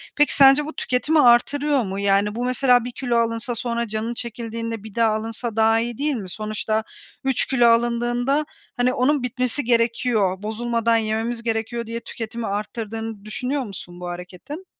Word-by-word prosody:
Peki 295 -1 +3
sence 275 +1 +7
bu 310 - -6
tüketimi 295 +5 +1
artırıyor 275 +4 +4
mu? 195 -1 -4
Yani 200 +1 +2
bu 245 - -2
mesela 250 -1 +3
1 245 - -4
kilo 245 -1 -1
alınsa 230 +1 0
sonra 235 0 -2
canın 220 +2 -3
çekildiğinde 230 -2 -5
bir 220 -2 -11
daha 230 -2 +3
alınsa 225 +1 -4
daha 225 0 +4
iyi 235 0 -3
değil 290 0 0
mi? 200 -6 -5
Sonuçta 215 +2 -2 0.4
3 265 -2 +1
kilo 245 -3 +3
alındığında 240 +4 +2 0.3
hani 245 +1 +2
onun 270 +1 +2
bitmesi 250 +3 -1
gerekiyor, 230 -5 +1
bozulmadan 230 +1 +1
yememiz 225 +2 -2
gerekiyor 230 +1 -2
diye 230 +1 -4
tüketimi 230 0 -6
arttırdığını 220 +1 -4
düşünüyor 255 +6 -2
musun 180 -5 -9
bu 180 - -6
hareketin? 180 - -8
230 Hz, 160 wpm, -22 LUFS, 220-250 Hz, 0.4 s, sence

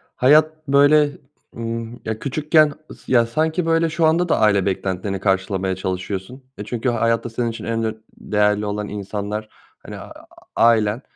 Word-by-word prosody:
hayat, 155 +3 +3
böyle, 145 +2 +5 0.5
ımm 115 +1 -5
Ya, 110 0 -3
küçükken 150 +2 +2 0.2
ıs - - -14
ya, 120 -2 +4
sanki, 160 +8 -1
böyle, 165 0 +2
şu 160 +1 +1
anda 170 +2 +2
da - - +2
aile 100 -3 +3
beklentilerini 95 0 -2
karşılamaya 95 -1 0
çalışıyorsun. 95 +7 -5
E, - - -5
çünkü 120 +4 -2
hayatta 115 0 0
senin 115 +1 -2
için 115 - -7
en 115 0 -1
ön 110 -1 -4
değerli 105 0 +1
olan 105 0 -3
insanlar, 105 +1 -5 0.3
hani, - - -10
aaa, - - -12 0.3
ailen 115 0 +3
115 Hz, 155 wpm, -21 LUFS, 105-145 Hz, 0.5 s, böyle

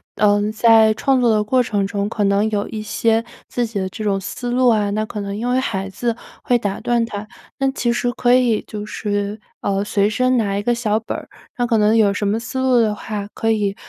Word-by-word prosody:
嗯 205 0 +2
在 220 0 +5
创 265 +3 +1
作 240 -2 +3
的 210 -1 +2
过 255 +4 +2
程 205 -4 -1
中， 200 0 -2
可 210 -1 -2
能 200 +2 +2
有 205 -1 -1
一 215 - -5
些 225 +1 +1 0.2
自 240 -1 -1
己 220 -3 -4
的 190 0 -2
这 215 - -7
种 195 -2 0
思 245 +5 -5
路， 250 0 +4 0.2
那 215 +1 -1
可 210 - -5
能 200 0 -4
因 235 +4 -2
为 250 +1 +2
孩 195 -6 -2
子 230 +4 -2 0.3
会 245 - +3
打 200 -3 -3
断 240 -1 +1
它。 210 -1 -6 0.3
那 270 -1 +1
其 240 -3 -1
实 245 +1 0
可 245 0 +2
以 245 -4 +2
就 210 -1 -6
是 205 0 -3 0.2
嗯 200 0 0
随 205 -1 +1
身 255 +4 +1
拿 200 -4 0
一 200 - -1
个 240 +3 +1
小 220 -2 0
本 225 - -5
儿， - - -10 0.3
那 245 - +1
可 230 -2 +2
能 215 +2 +4
有 205 -3 +4
什 205 0 -1
么 215 +3 0
思 240 +3 -5
路 260 -2 +3
的 215 -2 +2
话， 210 -1 -5
可 225 - -1
以 205 -3 +1
215 Hz, 255 characters per minute, -20 LUFS, 205-240 Hz, 0.3 s, 在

